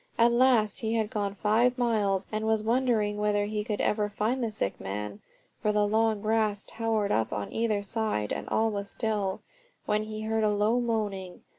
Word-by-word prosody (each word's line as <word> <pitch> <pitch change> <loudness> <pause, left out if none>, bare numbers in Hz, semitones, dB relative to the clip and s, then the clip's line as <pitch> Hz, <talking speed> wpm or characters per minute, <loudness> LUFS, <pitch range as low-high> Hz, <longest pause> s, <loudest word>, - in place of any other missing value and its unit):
At 235 +1 +5
last 235 -4 +3
he 225 0 -1
had 220 -2 0
gone 205 -1 -2
five 230 +5 +2
miles, 210 -6 +1
and 215 0 -2
was 220 -1 +2
wondering 225 -3 +1
whether 205 -1 +1
he 210 0 -2
could 210 -1 -3
ever 210 -1 +1
find 230 +5 -1
the 230 - 0
sick 210 - -2
man 100 +1 -5 0.4
(for 215 - +2
the 210 0 +2
long 220 0 +1
grass 215 -2 +1
towered 220 -3 -1
up 110 0 +1
on 105 -1 -4
either 215 -3 0
side 210 - -1
and - - -5
all 225 0 +2
was 200 -1 -3
still), 210 -4 -2 0.4
when 210 0 +1
he 215 0 -6
heard 220 0 0
a 215 - +3
low 215 +4 +2
moaning. 205 -6 -2
215 Hz, 190 wpm, -28 LUFS, 205-225 Hz, 0.4 s, At